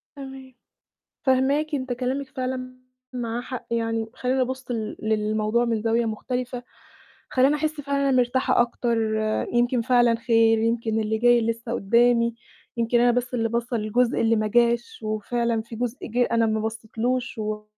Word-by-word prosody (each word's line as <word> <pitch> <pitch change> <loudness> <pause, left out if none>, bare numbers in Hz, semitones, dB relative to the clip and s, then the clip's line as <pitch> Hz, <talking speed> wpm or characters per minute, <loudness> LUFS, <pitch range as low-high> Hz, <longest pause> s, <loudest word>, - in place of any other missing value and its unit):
تمام، 265 -1 -10 0.7
فاهماكِ. 280 +4 +2
أنتِ 260 -2 -2
كلامِك 260 +2 -3
فعلًا 255 -1 -4 0.4
معاه 240 -1 -3
حق 255 0 -7
يعني، 225 -1 0
خلّاني 260 +1 0
أبُصّ 260 0 -3
ل 220 -2 -3
للموضوع 215 +2 +1
من 225 -2 -1
زاوية 230 +1 +1
مختلفة، 250 +2 -4 0.7
خلّاني 270 +3 +3
أحس 305 0 -2
فعلًا 280 0 -1
إن - - +1
أنا 260 -1 +3
مرتاحة 250 0 +2
أكتر، 235 0 0 0.6
يمكن 240 0 +2
فعلًا 240 -1 +3
خير، 225 -1 +3
يمكن 225 -1 0
اللي 220 0 0
جاي 240 0 +4
لسه 230 +1 -2
قدّامي، 235 +2 +3 0.4
يمكن 235 +1 +2
أنا 245 0 +5
بس 245 +1 -2
اللي 230 -2 0
باصّة 235 +1 -1
للجزء 230 +3 +1
اللي 225 0 +3
ما 215 0 0
جاش، 240 - +1
وفعلًا 225 +2 -1
فيه 225 0 -10
جزء 245 +2 -2
جِه 245 +2 +1
أنا 230 -1 +3
ما 220 0 0
بصيتلوش 225 +3 -3
و 210 0 -3
235 Hz, 160 wpm, -24 LUFS, 225-255 Hz, 0.7 s, أنا